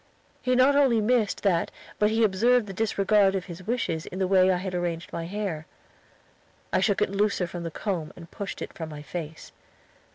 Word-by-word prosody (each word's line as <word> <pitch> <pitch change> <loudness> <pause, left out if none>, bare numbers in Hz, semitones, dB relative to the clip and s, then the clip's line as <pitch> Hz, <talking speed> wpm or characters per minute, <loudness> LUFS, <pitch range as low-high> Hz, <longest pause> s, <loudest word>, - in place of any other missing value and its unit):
He 255 0 +1
not 260 +3 +5
only 265 -5 +4
missed 220 -1 +1
that, 180 -5 +2 0.3
but 210 - +4
he 225 +1 +2
observed 225 +4 +3
the 195 - -7
disregard 200 -1 +2
of 190 -1 -2
his 185 +1 -10
wishes 220 -9 -1
in 185 - -7
the 190 -1 +1
way 185 0 +5
I 180 - +2
had 185 +1 -4
arranged 175 -1 -3
my 165 - -3
hair. 185 -5 -4 1.1
I - - +4
shook 200 -3 +2
it - - -2
looser 200 -2 +1
from 175 0 -6
the 170 - -4
comb 170 -2 -3
and 170 -2 -12
pushed 200 -1 -5
it - - -8
from 165 -4 -6
my 150 -1 -8
face. 160 -1 -7
195 Hz, 200 wpm, -26 LUFS, 175-215 Hz, 1.1 s, not